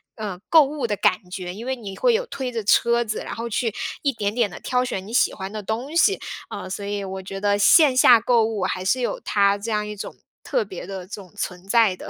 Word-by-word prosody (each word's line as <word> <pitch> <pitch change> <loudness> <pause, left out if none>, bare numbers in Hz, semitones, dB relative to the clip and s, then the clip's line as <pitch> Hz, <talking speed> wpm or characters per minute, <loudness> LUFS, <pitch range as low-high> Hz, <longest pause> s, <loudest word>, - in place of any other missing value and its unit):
嗯， 205 -5 -5
购 320 -2 +8
物 285 -2 -3
的 210 - -1
感 185 -1 +1
觉。 180 -1 -5
因 220 +5 -8
为 260 +1 -1
你 205 -6 -8
会 - - +3
有 480 +2 0
推 265 - -5
着 230 -2 -3
车 235 +3 +3
子， 215 -2 -3
然 - - -6
后 230 +1 -4
去 230 0 -1 0.3
一 280 - +2
点 205 -3 -2
点 235 -4 +2
地 175 - -10
挑 250 0 0
选 190 -6 -4
你 215 - -10
喜 - - +3
欢 190 0 -6
的 215 0 -5
东 240 +9 -4
西， 395 +4 +4 0.3
呃， - - -6
所 200 +2 -5
以 200 0 -3
我 190 0 -5
觉 195 +1 -6
得 205 0 +2
线 275 +6 +6
下 245 -2 +7
购 235 0 +3
物 220 -4 -2
还 185 0 -2
是 255 +6 +1
有 240 - -2
它 200 -1 +2
这 215 +3 -5
样 210 -1 0
一 210 - -6
种， 205 - -7 0.3
特 - - 0
别 190 -3 -8
的 190 -2 -6
这 200 - -6
种 180 -4 -16
存 180 +1 -5
在 220 -3 +4
的。 - - -10
215 Hz, 280 characters per minute, -23 LUFS, 195-245 Hz, 0.3 s, 购